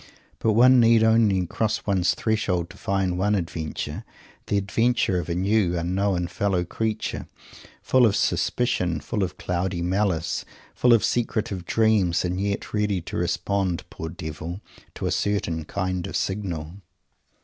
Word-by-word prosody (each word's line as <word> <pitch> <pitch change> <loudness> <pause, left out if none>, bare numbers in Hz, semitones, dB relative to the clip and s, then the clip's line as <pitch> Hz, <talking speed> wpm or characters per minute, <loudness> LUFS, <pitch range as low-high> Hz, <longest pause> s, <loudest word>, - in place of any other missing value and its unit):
But 110 - +2
one 125 +3 +6
need 115 -1 +5
only 110 -5 +3
cross 110 +5 -1
one's 95 -3 +2
threshold 90 -6 -1
to - - -14
find 95 -2 -1
one 105 +2 +2
adventure 80 -4 -4 0.4
the 100 - +1
adventure 100 -1 +1
of 90 - -5
a 85 - -1
new, 95 -1 +1
unknown 90 +1 0
fellow 95 -1 0
creature, 110 +4 -3 0.6
full 130 -2 +5
of 100 - +1
suspicion, 90 -9 0
full 85 +9 -3
of 90 -2 -2
cloudy 90 0 -2
malice, 90 -3 0 0.3
full 125 -1 +4
of 115 - +4
secretive 110 -6 -1
dreams, 105 -7 +2
and 90 +2 -2
yet 100 0 -3
ready 105 -2 +1
to - - -7
respond 90 +1 -1
poor 80 - -6
devil 80 +3 -6 0.4
to - - -4
a - - 0
certain 85 -6 -1
kind 95 -1 -2
of - - -6
signal! 95 -3 -3
95 Hz, 150 wpm, -24 LUFS, 90-105 Hz, 0.6 s, one